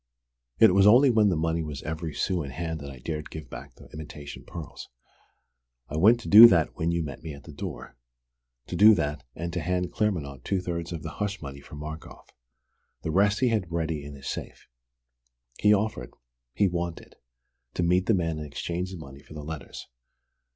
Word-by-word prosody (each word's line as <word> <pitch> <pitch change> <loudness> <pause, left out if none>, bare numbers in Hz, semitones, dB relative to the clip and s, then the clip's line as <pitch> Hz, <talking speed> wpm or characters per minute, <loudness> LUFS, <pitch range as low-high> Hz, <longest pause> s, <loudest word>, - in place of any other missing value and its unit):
It 110 -5 +6
was 95 +1 +5
only 125 +5 +7
when 110 -3 +4
the 90 - +1
money 80 +1 0
was 75 -3 -6
every 80 +1 -4
sou 90 +2 -1
in 70 - -5
hand 80 +3 -4
that 70 -1 -8
I 65 - -10
dared 75 +4 -5
give 80 -1 -9
back - - -9
the - - -15
imitation 75 -1 -9
pearls. 85 -5 -9 1.0
I 75 - -4
went 110 +8 +5
to - - -9
do 110 +3 +11
that 85 -7 +2
when 80 - -1
you 85 -1 0
met 70 -3 -7
me 80 -2 -7
at 70 - -14
the 80 - -11
door: 70 - -7 0.7
to - - -6
do 110 +1 +8
that 75 -4 -2
and 85 +1 -5
to 90 - -1
hand 90 +1 -1
Claremanagh 75 - -2
two 95 - 0
thirds 85 -2 -4
of 80 -4 -5
the - - -5
hush 100 -1 -2
money 70 -2 -8
for 75 - -12
Markoff. 75 +2 -9 0.7
The 80 - -2
rest 100 +5 +2
he 125 - +4
had 105 -7 -1
ready 80 -3 -2
in 70 0 -9
his 70 - -10
safe. - - -6 0.9
He 105 - +4
offered 105 - 0 0.4
he 100 - +3
wanted 85 -1 -5 0.6
to 90 - 0
meet 90 +2 +2
the 110 - +4
man 80 -3 -1
and 75 - -6
exchange 85 +5 -4
the 95 - -8
money 70 -4 -11
for 75 - -14
the 75 - -7
letters. 75 -2 -7
85 Hz, 200 wpm, -27 LUFS, 75-95 Hz, 1.0 s, do